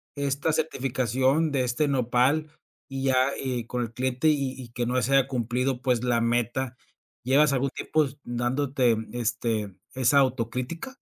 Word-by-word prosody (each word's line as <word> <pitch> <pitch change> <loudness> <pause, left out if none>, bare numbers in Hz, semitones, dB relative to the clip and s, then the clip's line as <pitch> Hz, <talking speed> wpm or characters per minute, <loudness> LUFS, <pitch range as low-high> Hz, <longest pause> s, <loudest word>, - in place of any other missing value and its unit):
esta 140 +2 0
certificación 135 0 +1
de 135 -2 +1
este 125 +5 0
Nopal, 135 +3 +1 0.4
y 135 -2 -5
ya, 130 0 +3
eh, 125 -3 -2
con 125 0 -2
el 115 -1 -6
cliente 130 +4 0
y 140 -3 0
y 120 - -10
que 120 +1 -3
no 125 +2 +1
se 135 - 0
haya 135 -1 +4
cumplido, 125 +1 -1
pues, 125 -3 +1
la 120 -2 +2
meta, 120 +2 -1 0.5
¿llevas 140 +4 +4
algún 135 +1 +1
tiempo 155 -1 0
s 135 0 -9
dándote, 125 +1 +1 0.2
este, 115 -3 -1 0.2
esa 130 +2 +4
autocrítica? 130 - -2
130 Hz, 155 wpm, -26 LUFS, 120-140 Hz, 0.5 s, haya